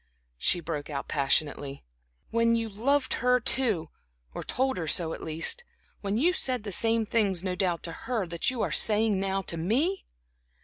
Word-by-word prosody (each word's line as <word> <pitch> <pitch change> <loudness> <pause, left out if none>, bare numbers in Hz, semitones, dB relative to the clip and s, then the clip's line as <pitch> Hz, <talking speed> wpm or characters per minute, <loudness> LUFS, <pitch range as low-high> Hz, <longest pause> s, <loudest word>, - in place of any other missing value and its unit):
she 175 - +4
broke 155 -3 -5
out 140 -2 -4
passionately, 140 -1 0 0.5
"when 230 0 +3
you 230 -1 -1
loved 260 +6 0
her 250 +1 +4
too, 230 -10 +1 0.4
or - - -5
told 265 +1 0
her 165 -3 -3
so 160 +1 +1
at - - -8
least, 165 - 0 0.4
when 200 +1 -2
you 340 +9 +3
said 255 - -1
the 205 - -5
same 225 +3 +3
things 200 -5 0
no 185 -1 -1
doubt 180 -2 -1
to 165 - -3
her 225 +3 -3
that 170 -1 -1
you 250 -3 -2
are - - -1
saying 215 -2 +3
now 195 0 -1
to 170 - -5
me?" 265 - 0
205 Hz, 180 wpm, -28 LUFS, 170-240 Hz, 0.5 s, she